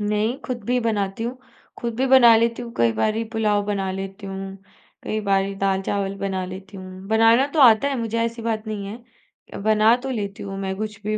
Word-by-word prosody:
नहीं, 210 Hz, +3 st, 0 dB
खुद 245 Hz, -4 st, -4 dB
भी 250 Hz, +3 st, +1 dB
बनाती 210 Hz, -3 st, -1 dB
हूँ। 250 Hz, +2 st, -4 dB, 0.4 s
खुद 235 Hz, -1 st, -3 dB
भी 265 Hz, +2 st, +1 dB
बना 255 Hz, -3 st, +7 dB
लेती 230 Hz, +1 st, 0 dB
हूँ, 235 Hz, -, -8 dB
कई 115 Hz, -1 st, +3 dB
बारी 215 Hz, -, 0 dB
पुलाव 210 Hz, -2 st, +1 dB
बना 195 Hz, -2 st, -1 dB
लेती 195 Hz, +1 st, -6 dB
हूँ, 195 Hz, 0 st, -6 dB, 0.5 s
कई 215 Hz, -, -2 dB
बारी 195 Hz, -1 st, 0 dB
दाल-चावल 195 Hz, 0 st, -1 dB
बना 190 Hz, -1 st, -2 dB
लेती 190 Hz, +2 st, -9 dB
हूँ, 185 Hz, 0 st, -10 dB
बनाना 225 Hz, +4 st, +5 dB
तो 310 Hz, -, +3 dB
आता 240 Hz, +1 st, +6 dB
है 275 Hz, -, -2 dB
मुझे 230 Hz, 0 st, -2 dB
ऐसी 230 Hz, 0 st, -4 dB
बात 220 Hz, -1 st, -2 dB
नहीं 210 Hz, -2 st, -4 dB
है, 230 Hz, +1 st, -12 dB
बना 215 Hz, +1 st, +4 dB
तो 270 Hz, -, -4 dB
लेती 200 Hz, -5 st, -4 dB
हूँ 195 Hz, -1 st, -6 dB
मैं 190 Hz, -1 st, -2 dB
कुछ 210 Hz, 0 st, -5 dB
भी 215 Hz, +1 st, -1 dB
215 Hz, 205 wpm, -22 LUFS, 195-230 Hz, 0.5 s, बना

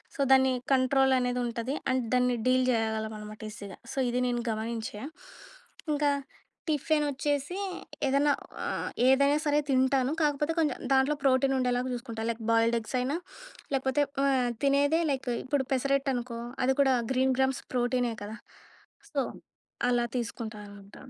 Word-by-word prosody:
So, -, -, -15 dB
దాన్ని 265 Hz, 0 st, +5 dB, 0.2 s
control 265 Hz, 0 st, +3 dB
అనేది 250 Hz, 0 st, 0 dB
ఉంటది. 240 Hz, +3 st, -3 dB, 0.2 s
అండ్ 255 Hz, -1 st, +1 dB
దాన్ని 250 Hz, 0 st, +3 dB
డీల్ 255 Hz, 0 st, +4 dB
చేయగలం 220 Hz, -1 st, -1 dB
అనమాట 210 Hz, +1 st, -9 dB
ఈజీగా. 200 Hz, -3 st, -9 dB
సో, -, -, -11 dB
ఇది 250 Hz, +1 st, 0 dB
నేను 240 Hz, -1 st, -1 dB
గమనించా. 220 Hz, 0 st, -4 dB, 0.9 s
ఇంకా, 290 Hz, 0 st, +2 dB, 0.6 s
టిఫెనొచ్చేసి 295 Hz, +1 st, 0 dB, 0.5 s
ఏదన్నా, 280 Hz, +2 st, +3 dB, 0.3 s
ఆహ్, -, -, -2 dB, 0.2 s
ఏదైనా 280 Hz, +2 st, +4 dB
సరే 295 Hz, 0 st, +3 dB
తింటాను. 260 Hz, 0 st, +2 dB
కాకపోతే 295 Hz, +1 st, +1 dB
కొంచెం 300 Hz, -5 st, +1 dB
దాంట్లో 265 Hz, +3 st, +3 dB
ప్రోటీన్ 270 Hz, 0 st, +3 dB
ఉండేలాగా 250 Hz, 0 st, 0 dB
చూసుకుంటా. 235 Hz, -2 st, -5 dB
లైక్ 230 Hz, 0 st, -3 dB
బాయిల్‌డ్ 230 Hz, +1 st, +3 dB
ఎగ్స్ 225 Hz, +3 st, -6 dB
అయినా 260 Hz, +4 st, -1 dB, 0.6 s
లేకపోతే 265 Hz, +2 st, +2 dB, 0.2 s
ఆహ్, 260 Hz, -3 st, +2 dB
తినేదే 285 Hz, +3 st, +3 dB
లైక్ 265 Hz, -1 st, -2 dB
ఇప్పుడు 270 Hz, 0 st, 0 dB
పెసరట్టనుకో, 260 Hz, -3 st, 0 dB, 0.3 s
అది 265 Hz, +1 st, +2 dB
కూడా 265 Hz, -2 st, +4 dB, 0.2 s
గ్రీన్ 260 Hz, 0 st, +2 dB
గ్రామ్స్ 265 Hz, 0 st, +1 dB
ప్రోటీనే 245 Hz, -1 st, +1 dB
కదా! 215 Hz, +2 st, -7 dB, 0.7 s
సో, -, -, +1 dB, 0.7 s
అలా 240 Hz, -1 st, +2 dB
తీసుకుంటానమాట. 210 Hz, -4 st, -7 dB
260 Hz, 135 wpm, -29 LUFS, 235-275 Hz, 0.9 s, దాన్ని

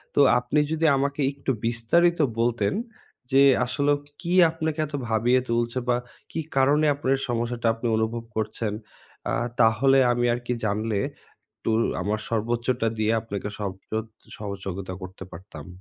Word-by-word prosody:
তো -, -, +3 dB, 0.2 s
আপনি 125 Hz, +5 st, 0 dB
যদি 160 Hz, 0 st, +1 dB
আমাকে 140 Hz, +1 st, -1 dB
একটু 140 Hz, -1 st, -3 dB
বিস্তারিত 165 Hz, +10 st, +2 dB, 0.2 s
বলতেন 115 Hz, -4 st, +1 dB, 0.6 s
যে, 135 Hz, +1 st, +6 dB, 0.2 s
আসলেও 145 Hz, +3 st, +1 dB, 0.2 s
কি 175 Hz, 0 st, -2 dB, 0.2 s
আপনাকে 160 Hz, -1 st, -3 dB
এত 150 Hz, -, -12 dB
ভাবিয়ে 120 Hz, +3 st, +3 dB
তুলছে 120 Hz, +1 st, 0 dB
বা 120 Hz, -, +3 dB, 0.4 s
কি -, -, -3 dB, 0.2 s
কারণে 145 Hz, +3 st, +4 dB
আপনার 135 Hz, -1 st, +1 dB
সমস্যাটা 120 Hz, 0 st, -1 dB
আপনি 115 Hz, +1 st, -4 dB
অনুভব 115 Hz, +1 st, -1 dB
করছেন? 110 Hz, -1 st, -2 dB, 0.6 s
আ -, -, 0 dB, 0.3 s
তাহলে 130 Hz, +4 st, +5 dB
আমি 120 Hz, 0 st, +1 dB
আর 120 Hz, -, -2 dB
কি 125 Hz, -, 0 dB
জানলে, 105 Hz, 0 st, 0 dB, 0.6 s
একটু -, -, -3 dB, 0.3 s
আমার 105 Hz, +3 st, -1 dB
সর্বোচ্চটা 115 Hz, +1 st, 0 dB
দিয়ে 110 Hz, +1 st, +2 dB
আপনাকে 105 Hz, -2 st, -5 dB
সব 100 Hz, -3 st, -2 dB, 0.2 s
সোদ 110 Hz, +1 st, -2 dB, 0.3 s
সহযোগিতা 95 Hz, -2 st, -5 dB
করতে 95 Hz, +1 st, -8 dB
পারতাম। 80 Hz, -5 st, -10 dB
115 Hz, 145 wpm, -25 LUFS, 110-135 Hz, 0.6 s, যে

